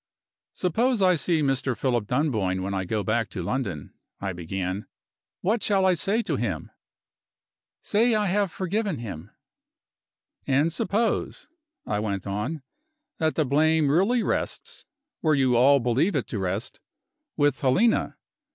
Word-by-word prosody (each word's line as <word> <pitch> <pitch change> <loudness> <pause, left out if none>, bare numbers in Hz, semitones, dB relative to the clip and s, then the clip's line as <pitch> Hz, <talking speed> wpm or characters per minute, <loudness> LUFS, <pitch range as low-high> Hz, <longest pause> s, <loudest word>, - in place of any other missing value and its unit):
"Suppose 230 +7 +1
I 185 -1 +5
see 165 -1 +1
Mr. 135 -2 0
Philip 120 -5 0
Dunboyne 110 -10 0
when 100 +1 -3
I 95 -1 -2
go 105 +2 -1
back 110 +1 0
to 95 -4 -5
London," 100 - -3 0.3
I 95 -1 -3
began, 95 +3 -4 0.5
"what 215 +4 +1
shall 195 -2 +2
I 185 - +5
say 205 +6 0
to 150 -9 -1
him?" 95 -11 -3 1.1
"Say 225 +2 +2
I 210 -1 +1
have 200 -1 +1
forgiven 195 -1 -2
him." 100 -6 -7 1.2
"And 145 +5 +2
suppose," 210 +6 -1 0.4
I 105 - -1
went 100 -3 -3
on, 105 +10 -3 0.6
"that 160 -1 +1
the 155 - +2
blame 155 +2 +3
really 200 +10 +3
rests, - - -3 0.3
where 155 -2 +2
you 130 -3 +3
all 140 +4 +6
believe 125 - +1
it - - 0
to 105 - -3
rest, 95 +5 -3 0.6
with 145 -4 +2
Helena. 185 - +2
140 Hz, 140 wpm, -25 LUFS, -, 1.2 s, all